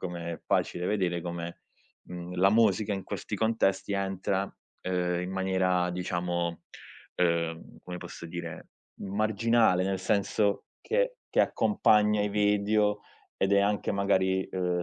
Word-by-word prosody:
come 85 -2 -4
è - - -8
facile 90 +1 0
vedere, 90 -4 0
come, 85 0 -6 0.4
mhmm, 90 0 -7
la 95 +2 +5
musica 105 -1 +3
in 95 - -3
questi - - -5
contesti 110 -3 +1
entra, 95 0 -1 0.3
ehm, 90 -1 0
in 90 - -4
maniera 95 -1 +1
diciamo, 85 -1 -2 0.5
ehm, 85 -2 -1
come 90 0 -7
posso 90 -1 -8
dire, 85 -1 -7 0.3
marginale, 110 0 +2
nel 95 -1 -1
senso 100 +2 +1 0.2
che - - 0 0.2
che - - +4
accompagna 105 - +3
i 105 - +1
video 105 0 +2 0.4
ed 95 +1 +1
è 100 - +5
anche 105 +1 0
magari, 95 -1 +2
ehm, 90 -1 -1
95 Hz, 135 wpm, -29 LUFS, 90-105 Hz, 0.5 s, la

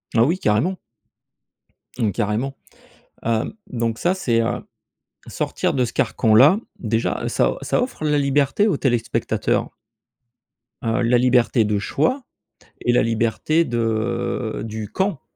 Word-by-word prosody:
Ah 115 - +5
oui, 165 +8 +2
carrément. 125 - +1 1.2
Mmh, 110 -3 +1
carrément, 115 +6 -2 0.7
heu, 115 - 0
donc 115 -2 -2
ça 180 +2 +1
c'est, 120 -11 +1
heu, 120 +2 -1 0.6
sortir - - -2
de 130 -2 +2
ce - - -4
carcan-là 130 - +4 0.2
déjà, 115 0 -1
ça - - +1
ça - - 0
offre 250 -11 -4
la 150 -1 +2
liberté 140 +8 +2
aux 180 - +1
téléspectateurs. 120 -4 0 1.1
Heu, 115 +1 0
la 120 +1 +3
liberté 125 -2 +3
de 105 -1 0
choix 255 - 0 0.6
et 120 - +2
la - - +4
liberté 115 +8 +1
de 115 -1 -2
du 110 -2 -6
quand. 190 -7 -1
120 Hz, 130 wpm, -21 LUFS, 115-145 Hz, 1.2 s, Ah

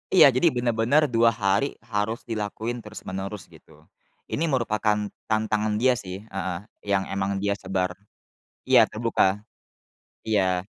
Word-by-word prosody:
Iya, 145 -7 +9
jadi 130 +7 +3
bener-bener 120 +4 +2
2 115 -1 +4
hari 100 +5 +1 0.2
harus 105 +3 -1
dilakuin 110 +2 -4
terus-menerus 100 -3 -6
gitu, - - -19 0.5
ini 165 - 0
merupakan 105 -6 0 0.2
tantangan 110 -1 0
dia 125 +2 +2
sih, 95 +1 -7
heeh, 95 -4 -4 0.3
yang 100 -1 +2
emang 100 0 -1
dia 100 - +1
sebar. 95 -1 -1 0.8
Iya - - +7
terbuka, 105 -3 +1 0.8
iya. 95 -5 +1
105 Hz, 125 wpm, -25 LUFS, 100-115 Hz, 0.8 s, Iya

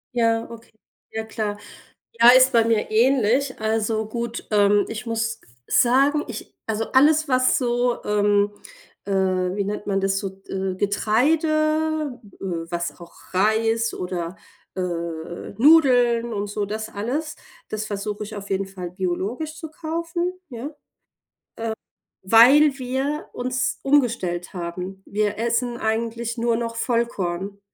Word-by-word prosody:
Ja, 230 -1 +2
okay. 230 0 -12 0.4
Ja, 220 0 -3
klar. 215 -2 -3 0.6
Ja, 235 +1 +10
ist 255 +1 +6
bei 230 -1 +5
mir 225 -2 +1
ähnlich. 255 +2 +2
Also 220 0 0
gut, 235 +1 -4
ähm, 205 -1 +4
ich 225 +2 -6
muss 230 0 -2 0.3
sagen, 275 +5 +3
ich 230 -3 -8
also 220 0 -2
alles, 305 +3 +5
was 255 0 +3
so, 245 -1 0
ähm, 205 0 +2 0.5
äh, 200 - -4
wie 185 0 +1
nennt 205 +1 -4
man 195 -1 0
das 195 0 +1
so, 195 -1 -7
äh, 190 -1 -2
Getreide 310 - +1 0.2
äh, - - -7 0.2
was 175 +1 -4
auch 170 - -13 0.2
Reis 225 +3 +2
oder, 180 0 -4 0.4
äh, 190 - -3
Nudeln 230 - +2
und 205 0 -3
so 205 0 -2
das 220 +2 -4
alles, 280 +10 -3 0.3
das 215 0 -3
versuche 210 +1 -4
ich 215 - -9
auf 200 -1 -8
jeden 195 0 0
Fall 185 -2 -7
biologisch 195 - -3
zu 320 -2 -8
kaufen. 335 +3 -3 0.2
Ja, 240 +3 -6
äh, - - -5 1.5
weil 265 +8 +6
wir 265 +4 -2
uns 255 +1 -2
umgestellt 230 -12 +1
haben. 180 +2 -6
Wir 205 0 -1
essen 235 +1 0
eigentlich 230 +1 -2
nur 235 0 +1
noch 230 0 -3
Vollkorn. 200 -5 -2
225 Hz, 135 wpm, -23 LUFS, 200-255 Hz, 1.5 s, Ja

